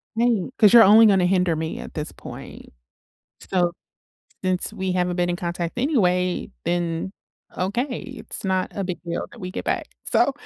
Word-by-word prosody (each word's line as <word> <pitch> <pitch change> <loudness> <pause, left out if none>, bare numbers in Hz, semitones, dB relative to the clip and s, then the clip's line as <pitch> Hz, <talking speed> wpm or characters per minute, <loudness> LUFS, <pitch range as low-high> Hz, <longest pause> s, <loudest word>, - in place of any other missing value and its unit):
Right, 230 -2 +1
'cause 210 -2 +6
you're 235 - +10
only 220 +3 +8
gonna 195 -4 +4
hinder 180 -2 +2
me 160 +1 -4
at - - -9
this 150 0 -4
point. - - -11 0.8
So, 175 -2 +2 0.7
since 185 -1 0
we 190 -1 -2
haven't 180 -1 0
been 175 -1 +1
in 175 - -1
contact 175 +3 -4
anyway, 180 - +1
then, 170 +1 -1 0.4
okay, 235 +8 -1 0.2
it's - - -5
not 190 -1 0
a 200 - -2
big 180 -3 -4
deal 170 -1 -4
that 240 - -14
we 185 -1 -5
get - - -5
back, - - -1 0.2
so, - - +3
185 Hz, 170 wpm, -23 LUFS, 175-205 Hz, 0.8 s, you're